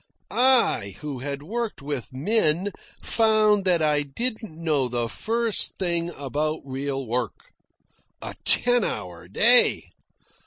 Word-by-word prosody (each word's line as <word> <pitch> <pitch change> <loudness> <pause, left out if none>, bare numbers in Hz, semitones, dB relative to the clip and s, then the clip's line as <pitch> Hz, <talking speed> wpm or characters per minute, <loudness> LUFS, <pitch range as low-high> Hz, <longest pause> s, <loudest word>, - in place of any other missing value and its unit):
I, 240 - +2
who 145 -4 -6
had 140 +2 -6
worked 230 +6 -4
with 140 -3 -6
men, 175 - 0 0.3
found 215 -3 +2
that 175 -3 +2
I 150 -1 +2
didn't 220 - -3
know 155 -6 0
the 120 -1 -2
first 225 - 0
thing 170 -2 -1
about 150 +3 -3
real 135 0 -4
work. 120 -2 -4 0.7
A - - -8
ten 245 -1 +4
hour 90 - -6
day! 235 - +4
155 Hz, 120 wpm, -24 LUFS, 135-215 Hz, 0.7 s, ten